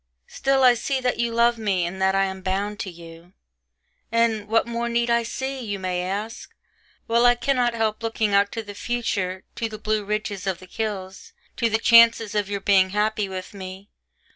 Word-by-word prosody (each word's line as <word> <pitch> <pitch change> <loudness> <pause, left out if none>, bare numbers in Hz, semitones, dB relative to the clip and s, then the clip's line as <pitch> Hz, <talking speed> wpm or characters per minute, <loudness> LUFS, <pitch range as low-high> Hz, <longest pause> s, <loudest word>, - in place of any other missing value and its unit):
Still 270 - 0
I 250 -1 +7
see 265 +3 -2
that 250 -2 -1
you 235 0 0
love 235 0 +2
me 195 -5 0
and 190 +2 -5
that 190 0 +3
I 195 0 +3
am 190 0 -5
bound 200 +2 -2
to 190 - -4
you: 170 +1 -13 0.8
and 230 -2 +1
'what 225 +1 +2
more 235 0 -3
need 235 0 +1
I 235 0 +3
see,' 265 +3 -4
you 205 -3 -3
may 185 -1 -2
ask; 205 +5 -5 0.5
while 235 +1 +3
I 245 - +5
cannot 245 -1 +1
help 220 -1 -1
looking 225 -2 -1
out 200 0 +3
to 225 - -4
the 205 -1 -9
future, 195 -5 -2
to 230 - -2
the 215 - -7
blue 215 0 -1
ridges 205 -1 -3
of 190 -3 0
the 185 - -13
hills, 195 -1 -5 0.2
to 230 - +1
the 220 - +2
chances 230 -1 +5
of 205 -2 -1
your 200 -1 -3
being 190 -2 +4
happy 210 0 0
with 185 0 -7
me. 190 +1 -9
215 Hz, 200 wpm, -23 LUFS, 190-230 Hz, 0.8 s, I